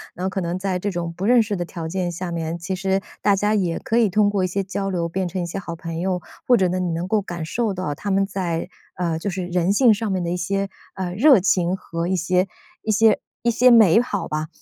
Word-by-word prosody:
然 180 - -4
后 - - +1
可 190 0 -3
能 170 +1 -2
在 185 -1 -2
这 205 - -2
种 170 -3 -3
不 185 - -6
认 240 +1 +5
识 210 -1 -3
的 175 - -2
条 165 -2 -6
件 180 0 -2
下 175 +1 -5
面， 165 0 -3
其 180 +3 -4
实 190 +1 0 0.2
大 205 - +4
家 205 +2 +1
也 180 -5 0
可 225 - -1
以 220 - +4
通 210 +2 +3
过 200 -2 0
一 - - +2
些 195 +2 -2
交 195 +1 -3
流 175 -3 -1
变 185 +2 -2
成 180 +2 -4
一 175 - -1
些 170 +3 -4
好 170 -3 -6
朋 165 0 -6
友， 185 0 -1 0.3
或 245 - +6
者 190 -3 +3
呢 185 +1 -1
你 180 -1 -1
能 165 +2 -2
够 215 +2 +2
感 175 -4 -5
受 220 +3 -1
到 185 -5 -2
他 205 +8 -6
们 195 0 +2
在， 180 -4 -3 0.3
呃， 170 -3 -1
就 200 - -3
是 185 -1 -3
人 180 +1 +1
性 230 +2 +5
上 215 -1 -2
面 185 -2 -1
的 170 - -2
一 180 - -1
些， 195 +3 -1 0.3
呃， 185 -2 -3
热 255 +4 +6
情 180 -1 +1
和 165 -2 -4
一 190 - +1
些 180 +2 +1 0.3
一 220 - -1
些 215 +1 +4 0.2
一 235 - +3
些 250 +2 +5
美 225 -4 +7
好 210 -5 -3
吧。 155 +1 -3
185 Hz, 285 characters per minute, -22 LUFS, 175-200 Hz, 0.3 s, 美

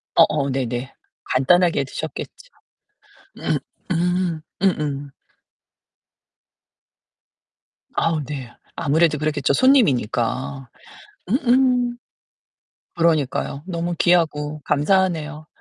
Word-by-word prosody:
어어, 140 -2 +4
네네. 130 -1 -3 0.4
간단하게 165 +3 +3
드셨겠죠. - - -6 1.1
음 - - 0 0.3
음. 175 -1 0 0.2
음음. 145 -6 0 2.9
아우, 160 -2 +1
네. 135 -4 -6 0.2
아무래도 160 0 +2
그랬겠죠, 145 -2 0
손님이니까. 135 - +2 0.6
음음. 250 0 +2 1.0
그러니까요. 150 -3 0
너무 175 -1 -2
귀하고 155 -4 +1
감사하네요. 155 -1 +1
155 Hz, 190 characters per minute, -21 LUFS, 140-180 Hz, 2.9 s, 어어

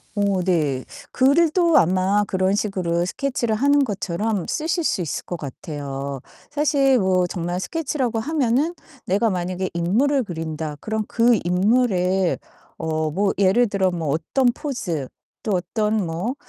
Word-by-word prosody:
어 200 -2 +1
네. 150 -8 0 0.3
글도 330 +5 +4
아마 190 +4 +3
그런 190 +1 +1
식으로 180 -5 0
스케치를 245 0 -1
하는 285 +4 +3
것처럼 205 -2 -2
쓰실 330 +2 -1
수 190 - 0
있을 165 - -3
것 175 - -4
같아요. 140 -1 -6 0.3
사실 285 -3 +3
뭐 185 -2 +2
정말 175 +1 -3
스케치라고 260 - -2
하면은 285 +3 +1 0.3
내가 205 +4 +2
만약에 185 0 -2
'인물을 240 +11 +2
그린다.' 160 -4 -5
그럼 220 0 -2
그 235 -1 +3
인물의 185 -1 +2 0.4
어 160 -1 -1
뭐 195 +5 +1
예를 200 +5 +4
들어 190 -2 +1
뭐 165 -3 -3
어떤 165 - +1
포즈 235 - -2 0.4
또 215 - -2
어떤 210 +3 0
뭐 175 +10 -3
195 Hz, 270 characters per minute, -22 LUFS, 175-245 Hz, 0.4 s, 글도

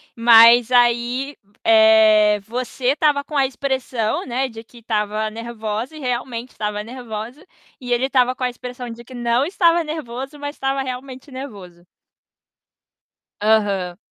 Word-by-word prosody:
Mas 235 +1 +7
aí, 245 +3 +1 0.3
eh, 220 -1 +5
você 245 +3 -5
estava 285 0 +2
com 300 -1 -5
a 270 - +4
expressão, 260 -4 -2
né, 260 +1 -2
de 225 0 -10
que 240 +1 -17
estava 215 -1 -2
nervosa 225 +3 -5
e - - -9
realmente 250 -1 -4
estava 210 0 -4
nervosa, 240 - -8 0.3
e 245 -1 -3
ele 245 +2 +1
estava 255 -1 +2
com 255 - -6
a 250 - +1
expressão 245 0 -8
de 235 +1 -9
que 255 - -13
não 240 +2 0
estava 340 -2 +2
nervoso, 285 -2 -6
mas 290 +1 -6
estava 270 0 -1
realmente 260 +1 -7
nervoso. 195 -10 -10 1.6
Aham. 200 -5 +1
245 Hz, 140 wpm, -20 LUFS, 220-265 Hz, 1.6 s, Mas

